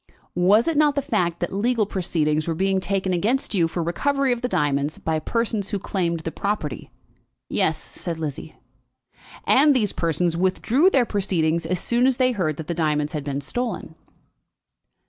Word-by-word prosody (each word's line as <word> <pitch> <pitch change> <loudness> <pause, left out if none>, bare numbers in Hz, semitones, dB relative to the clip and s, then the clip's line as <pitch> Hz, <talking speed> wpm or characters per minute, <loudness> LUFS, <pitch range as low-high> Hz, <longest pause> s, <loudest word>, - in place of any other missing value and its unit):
Was 195 - +4
it 330 -3 +1
not 295 -1 +4
the 280 - +1
fact 175 -8 0
that 175 - -2
legal 225 +2 +1
proceedings 155 -5 0
were 165 - -1
being 190 +2 +1
taken 190 0 -1
against 225 +11 0
you 175 -5 +3
for 170 +1 -3
recovery 275 +10 +1
of 240 - -5
the 250 - 0
diamonds 145 - 0
by 160 -1 -1
persons 220 +2 -1
who 205 - -1
claimed 170 -4 -2
the 165 - -4
property?" 200 -10 -3 0.6
"Yes," 160 - +1
said 165 +1 -7
Lizzie. 155 0 -6 0.9
"And 285 +1 +5
these 215 -6 +1
persons 165 +1 0
withdrew 215 - +2
their 265 -9 +3
proceedings 170 -6 0
as 180 +1 0
soon 240 +5 +2
as 260 -2 +1
they 255 -1 +3
heard 170 - -1
that 160 - -6
the 170 - -3
diamonds 150 -2 0
had 150 -2 -3
been 140 0 -3
stolen?" 225 - -3
185 Hz, 175 wpm, -23 LUFS, 160-230 Hz, 0.9 s, And